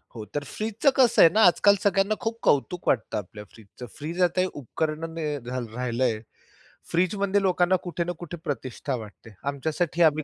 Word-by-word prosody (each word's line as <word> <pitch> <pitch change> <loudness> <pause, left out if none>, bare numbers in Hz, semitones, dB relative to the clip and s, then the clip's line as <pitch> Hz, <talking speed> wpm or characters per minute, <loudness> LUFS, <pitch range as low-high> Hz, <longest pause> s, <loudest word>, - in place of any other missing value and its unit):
हो, 110 - -6
तर 145 - -1
फ्रीजचं 220 - 0
कसं 255 -4 +5
आहे 165 - +9
ना, 220 - +4
आजकाल 200 +2 +4
सगळ्यांना 200 +1 +2
खूप 225 +1 -3
कौतुक 175 +6 +1
वाटतं 110 -3 +1
आपल्या 105 +1 -7
फ्रीजचं. 110 +3 -12
फ्रीज 165 +5 -4
आता 180 +1 +2
हे 185 - +1
उपकरण 155 +4 -3
नाही 150 -3 -2
घाल 125 0 -5
राहिलंय, 120 -2 -1 0.7
फ्रीजमध्ये 195 +3 +1
लोकांना 180 -1 +3
कुठे 175 -1 -2
ना 175 - -3
कुठे 175 0 -7
प्रतिष्ठा 130 0 -3
वाटते. 110 -1 -11
आमच्यासाठी 160 +4 -1
आम्ही 155 -1 +3
160 Hz, 170 wpm, -26 LUFS, 125-185 Hz, 0.7 s, आहे